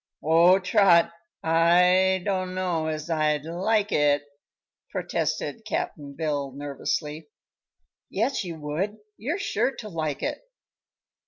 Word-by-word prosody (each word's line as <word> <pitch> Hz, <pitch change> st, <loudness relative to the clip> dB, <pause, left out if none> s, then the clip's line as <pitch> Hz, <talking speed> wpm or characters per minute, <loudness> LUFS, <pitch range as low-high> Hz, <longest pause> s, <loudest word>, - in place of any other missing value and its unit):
"Oh, 170 Hz, +4 st, +6 dB
Trot! 185 Hz, -3 st, +4 dB, 0.3 s
I 180 Hz, +3 st, +4 dB
dunno 185 Hz, -4 st, -1 dB
as 155 Hz, 0 st, -3 dB
I'd 155 Hz, -2 st, +1 dB
like 200 Hz, +5 st, 0 dB
it," 145 Hz, -1 st, +3 dB, 0.7 s
protested -, -, -2 dB
Cap'n 140 Hz, -1 st, -4 dB
Bill, 145 Hz, -3 st, -2 dB
nervously. 150 Hz, +2 st, -4 dB, 0.8 s
"Yes, 230 Hz, +6 st, 0 dB
you 170 Hz, -3 st, -6 dB
would. 165 Hz, +8 st, -3 dB, 0.2 s
You're 280 Hz, -, -2 dB
sure 400 Hz, -10 st, 0 dB
to 215 Hz, -, -8 dB
like 155 Hz, -5 st, -3 dB
it." -, -, -2 dB
170 Hz, 105 wpm, -26 LUFS, 150-190 Hz, 0.8 s, Oh